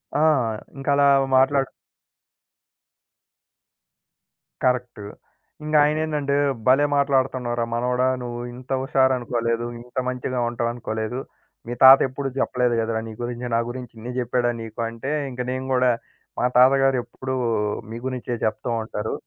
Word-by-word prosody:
ఆ! - - +2 0.6
ఇంకలా 140 +1 +2 0.3
మాట్లాడు 135 +1 +3 2.9
కరక్ట్. 125 -3 0 0.6
ఇంగాయనేందంటే, 150 -1 +1 0.3
"భలే 135 +3 +5
మాట్లాడతన్నావురా 130 -4 +1
మనవడా! 125 +2 +1 0.2
నువ్వు 120 0 -5
ఇంత 130 +2 -12
హుషారనుకోలేదు. 120 -3 +1
ఇంత 125 +2 -14
మంచిగా 125 0 -3
ఉంటావనుకోలేదు. 115 0 -3 0.5
మీ 120 - -3
తాతెప్పుడూ 135 +1 +6
చెప్పలేదు 125 -2 +1
గద 115 0 -1
రా - - 0
నీ 110 - -7
గురించి, 120 0 -4
నా - - +3
గురించి 125 0 -7
ఇన్ని 120 +3 -6
జెప్పాడా 120 0 0
నీకు?" 110 0 -9
అంటే 115 +5 -5 0.2
ఇంక 125 0 -5
నేను 130 +1 -3
గూడా 125 -1 +4 0.5
మా - - +2
తాతగారు 135 +1 +5
ఎప్పుడూ 130 +2 -5 0.6
మీ 115 - -5
గురించే 125 -1 -4
జెప్తూ 110 +3 -1
ఉంటారు. 110 0 -4
125 Hz, 115 wpm, -23 LUFS, 120-135 Hz, 2.9 s, తాతెప్పుడూ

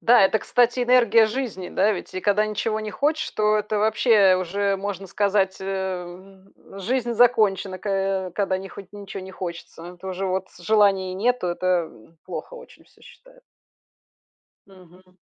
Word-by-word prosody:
Да, 240 0 +5
это, 200 +3 +3
кстати, 245 +1 +2
энергия 240 -2 +5
жизни, 220 -6 -4
да 210 +3 +2
ведь? 185 - -7
И 185 - -4
когда 205 +2 +2
ничего 215 +1 -2
не 215 - -5
хочешь, 295 +10 -1
то 215 0 +2
это, 210 0 -2
вообще, 215 -3 +4
уже 195 +2 -1
можно 195 0 -5
сказать, 195 0 0
э - - -6
м, 190 0 -6 0.3
жизнь 240 +3 -1
закончена, 210 -5 +2
ко 195 -1 -2
когда 195 -2 0
не 195 - -8
хоть 195 -1 -12
ничего 200 -2 -8
не 190 - -9
хочется. 175 -1 -8
То 190 - -7
уже 190 +1 -3
вот 190 0 -2
желания 195 -1 +2
нету- 245 +1 0
это, 175 -1 0
м, 120 +9 -20
плохо - - -7
очень - - -14
всё, - - -27
считаю. - - -18 1.2
Мгм. 185 -1 -20
195 Hz, 160 wpm, -23 LUFS, 185-215 Hz, 1.2 s, Да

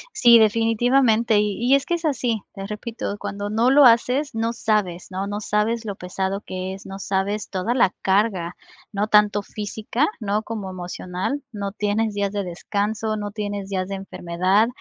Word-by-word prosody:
Sí, 235 - +7
definitivamente, 225 +1 +3
y 210 +4 0
y - - +8
es 275 0 +1
que - - -1
es 340 0 -2
así. 245 -7 0
Te 195 - -6
repito, 210 0 -5
cuando 205 0 -5
no 230 +4 +3
lo 285 0 +7
haces, 250 +3 +3
no 225 +1 0
sabes, 210 -6 -1
¿no?, 190 +1 -3
no 205 +1 -3
sabes 215 +2 0
lo 200 -2 -4
pesado 190 +2 -3
que 185 -2 -5
es, 195 - -10
no 195 0 -7
sabes 200 +2 -2
toda 195 +5 -1
la 230 -7 +3
carga, 190 -3 +1 0.4
no 205 0 -1
tanto 210 -1 +4
física, 215 +7 -2
¿no?, 210 -1 -1
como 215 -4 -5
emocional. 185 +7 -4
No 200 -1 -4
tienes 210 +1 -1
días 200 -1 -1
de 205 -1 -1
descanso, 205 +4 -2
no 205 -1 -4
tienes 205 -2 -4
días 185 -2 -2
de 195 - -4
enfermedad, 190 +2 +1
210 Hz, 180 wpm, -23 LUFS, 195-225 Hz, 0.4 s, y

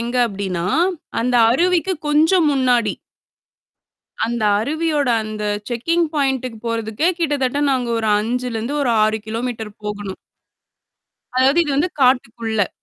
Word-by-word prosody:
எங்க 240 +2 -3
அப்படின்னா, 190 -5 -3 0.6
அந்த 250 +1 0 0.2
அருவிக்கு 360 +7 +2 0.2
கொஞ்சம் 315 +3 +4
முன்னாடி. 245 -5 +2 1.3
அந்த 235 -1 -2 0.2
அருவியோட 300 +3 0 0.2
அந்த 215 0 -5 0.3
செக்கிங் 330 +8 0
பாயிண்டுக்கு 265 -5 -1
போறதுக்கே 230 +7 0
கிட்ட 305 -3 +1
தட்ட 260 +3 0
நாங்க 250 -3 -1
ஒரு 220 -1 0
5லருந்து 235 +2 -2
ஒரு 260 - +1
6 215 0 +1
கிலோமீட்டர் 225 -1 -4
போகணும். 205 -2 -5 1.2
அதாவது, 270 +5 +4
இது 295 - -2
வந்து 340 +5 +1
காட்டுக்குள்ள. 230 -5 +1
245 Hz, 115 wpm, -20 LUFS, 220-290 Hz, 1.3 s, கொஞ்சம்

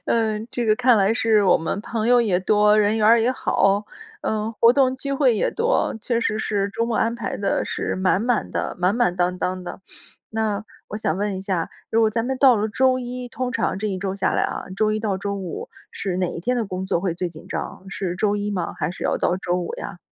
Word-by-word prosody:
嗯， 220 -1 0
这 240 -1 -2
个 215 - +5
看 250 0 +4
来 200 +3 +3
是 220 -2 +3
我 185 - +5
们 165 +5 -3
朋 220 +1 -2
友 245 0 +6
也 195 -6 +2
多， 210 +2 +4
人 210 +1 +2
缘 210 - +3
儿 230 +1 +6
也 235 - +2
好， 200 -5 +1 0.4
嗯， 215 +1 -1
活 230 +2 +5
动 260 -1 +2
机 275 +1 -4
会 265 -4 +3
也 - - +1
多， 475 +2 +1
确 235 +1 0
实 215 -2 0
是 200 -2 0
周 230 +3 -1
末 235 -2 -1
安 230 +1 +1
排 235 -4 -4
得 200 - 0
是 - - -3
满 185 +1 +2
满 240 -1 0
的 - - -2
满 180 +3 +2
满 235 -7 +2
当 180 0 0
当 185 0 -2
的。 180 - -8 0.5
那 220 -1 -1 0.2
我 210 - -5
想 180 -6 -1
问 205 -1 -1
一 185 - -5
下， 190 -4 -2 0.2
如 225 - +3
果 220 -1 +4
咱 230 +1 -1
们 265 - -1
到 260 -4 +6
了 210 +1 0
周 255 +4 +2
一， 250 0 -6
通 250 +1 -3
常 185 - -1
这 215 - -2
一 190 -3 -2
周 195 0 -3
下 195 -1 0
来 - - +1
啊， - - -2
周 215 +1 +2
一 215 - 0
到 210 -3 -1
周 200 +1 -3
五 185 -4 -6 0.2
是 185 -2 -3
哪 185 -1 +1
一 170 - -5
天 250 +7 0
的 235 - 0
工 185 0 -4
作 170 - 0
会 180 -2 -1
最 180 +1 -2
紧 160 -2 -13
张， - - -5
是 185 -2 -3
周 205 0 +1
一 205 0 -2
吗， 180 -4 -3
还 - - -1
是 - - -7
要 - - +1
到 180 - +1
周 180 -1 -1
五 175 - -3
呀？ 195 - -7
210 Hz, 270 characters per minute, -22 LUFS, 190-230 Hz, 0.5 s, 友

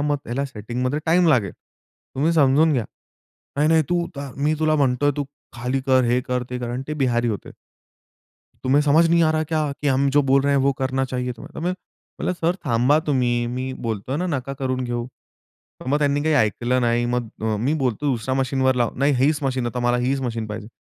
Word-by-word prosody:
मग 145 0 +1
त्याला 130 +4 -2
सेटिंगमध्ये 125 +3 -3
टाईम 175 +1 +4
लागेल, 115 - +2
तुम्ही 155 +5 -5
समजून 155 +1 +4
घ्या." 125 -5 0 0.7
"नाही, 150 +2 +3
नाही 160 0 +4
तू 175 -1 +1
ता 140 -1 -5
मी 145 +3 +1
तुला 155 0 +2
म्हणतोय, 140 +1 +2
"तू 145 - -1 0.3
खाली 125 +3 -2
कर, 130 -1 +4
हे 120 +1 +2
कर, 125 0 -2
ते 125 - -3
कर."आणि 120 +1 -4
ते 150 - -2
बिहारी 120 -4 +1
होते. 105 - -4 1.1
तुम्हे 135 +3 +4
समझ 155 +3 +4
नहीं 170 0 +4
आ 155 - +3
रहा 155 0 +1
क्या 155 -2 0
की 145 - +2
हम 135 +1 +2
जो 145 - +5
बोल 135 +1 +5
रहे 140 0 +2
है, - - +3
वो 140 +1 +3
करना 130 0 0
चाहिए 125 -1 -3
तुम्हे. 175 +9 -4 0.5
म्हणलं, - - -1
"सर 170 +2 +2
थांबा 130 +3 +3
तुम्ही 120 -4 +1
मी 130 +2 -3
बोलतोय 115 +4 -3
ना 180 +4 -1
नका 135 -4 -3
करून 130 -2 -1
घेऊ." 120 -1 -3 0.8
मग 140 +3 +2
त्यांनी 145 -1 +1
काही 160 0 +2
ऐकलं 125 +1 +1
नाही 120 0 +1
मग 120 -1 -1 0.2
अ, 110 -1 0
मी 125 +8 0
बोलतो, 125 +3 -1
"दुसरा 125 +1 -2
मशीनवर 130 0 +1
लाव." 120 -2 +1
"नाही 140 +2 +3
हीच 145 +4 +2
मशीन, 130 -2 -1
आता 125 +1 -4
मला 120 0 +1
हीच 130 +3 0
मशीन 115 -3 -3
पाहिजे." 105 0 -6
130 Hz, 205 wpm, -22 LUFS, 120-145 Hz, 1.1 s, जो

